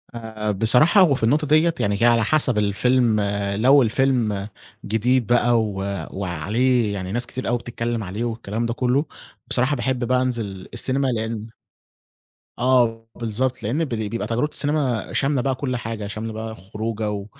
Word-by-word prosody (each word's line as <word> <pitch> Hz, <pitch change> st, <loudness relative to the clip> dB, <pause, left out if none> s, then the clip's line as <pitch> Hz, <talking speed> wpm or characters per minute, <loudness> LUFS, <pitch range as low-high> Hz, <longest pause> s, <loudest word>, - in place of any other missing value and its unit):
آآ، 110 Hz, -2 st, -4 dB
بصراحة 125 Hz, -, +5 dB
هو 165 Hz, -7 st, +5 dB
في 115 Hz, -, -5 dB
النقطة 150 Hz, +6 st, +2 dB
ديّة 155 Hz, +3 st, +4 dB
يعني 100 Hz, +3 st, +1 dB
على 115 Hz, -2 st, +4 dB
حسب 130 Hz, -2 st, +2 dB
الفيلم، 110 Hz, +2 st, +2 dB, 0.3 s
لو 135 Hz, +6 st, +5 dB
الفيلم 115 Hz, -4 st, +1 dB, 0.4 s
جديد 115 Hz, +3 st, +1 dB
بقى 120 Hz, 0 st, +3 dB
و 105 Hz, -2 st, -3 dB, 0.4 s
وعليه 105 Hz, +5 st, 0 dB
يعني 95 Hz, -1 st, -5 dB
ناس 120 Hz, +2 st, 0 dB
كتير 130 Hz, +2 st, -5 dB
أوي 120 Hz, -, +1 dB
بتتكلم 120 Hz, -1 st, -4 dB
عليه 95 Hz, +5 st, -4 dB
والكلام 115 Hz, -1 st, -3 dB
ده 115 Hz, -, -1 dB
كُلّه، 130 Hz, +4 st, +1 dB, 0.4 s
بصراحة 130 Hz, +3 st, +1 dB
باحب 130 Hz, -2 st, -1 dB
بقى 125 Hz, +1 st, +2 dB
أنزل 110 Hz, -7 st, -3 dB
السينما 135 Hz, +1 st, 0 dB
لأن 110 Hz, -2 st, -3 dB, 1.1 s
آه، 120 Hz, -3 st, +2 dB
بالضبط 120 Hz, +3 st, -2 dB
لأن 145 Hz, +10 st, 0 dB
ب -, -, -9 dB
بيبقى 110 Hz, -2 st, -3 dB
تجربة 120 Hz, +6 st, 0 dB
السينما 145 Hz, -6 st, -1 dB
شاملة 135 Hz, -2 st, +1 dB
بقى 135 Hz, 0 st, 0 dB
كُل 130 Hz, -1 st, -3 dB
حاجة، 110 Hz, -2 st, -5 dB
شاملة 110 Hz, +1 st, -5 dB
بقى 110 Hz, 0 st, -6 dB
خروجة، 105 Hz, +1 st, -4 dB
115 Hz, 155 wpm, -22 LUFS, 110-130 Hz, 1.1 s, بصراحة